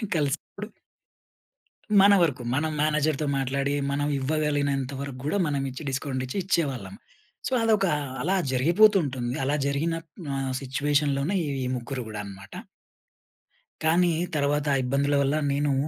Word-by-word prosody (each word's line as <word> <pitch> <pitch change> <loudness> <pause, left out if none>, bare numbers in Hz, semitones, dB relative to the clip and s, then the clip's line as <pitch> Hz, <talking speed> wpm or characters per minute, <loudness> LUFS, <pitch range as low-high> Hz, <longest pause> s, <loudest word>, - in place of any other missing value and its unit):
కలిసినప్పుడు 155 +7 -2 1.3
మన 200 +1 +7
వరకు. 145 -7 +1
మనం 155 +4 0
మేనేజర్‌తో 155 0 +1
మాట్లాడి 140 +1 -1 0.2
మనం 145 +1 0
ఇవ్వగలిగినంత 145 -2 0
వరకు 140 -2 -6
కూడా 155 +7 0
మనం 145 -2 -1
ఇచ్చి 130 +4 -8
డిస్కౌంట్ 130 -1 -2
ఇచ్చి 130 - -5
ఇచ్చేవాళ్ళం. 135 - -1 0.5
సో, - - -5
అదొక 215 -3 +3 0.3
అలా 185 +5 +1 0.2
జరిగిపోతుంటుంది. 140 - +3
అలా 140 +2 +1
జరిగిన 145 +4 0 0.4
ఆహ్, 135 -1 -2
సిచ్యుయేషన్‌లోనే 140 +4 0 0.3
ఈ - - -2
ముగ్గురు 125 +1 -4
కూడా 105 -1 -6
అన్నమాట. 100 -1 -11 1.3
కానీ 170 +2 +3 0.2
తర్వాత 145 0 +1 0.2
ఇబ్బందుల 140 +3 +1
వల్ల 140 +2 +1 0.2
నేను 145 0 +1
140 Hz, 120 wpm, -26 LUFS, 130-155 Hz, 1.3 s, మన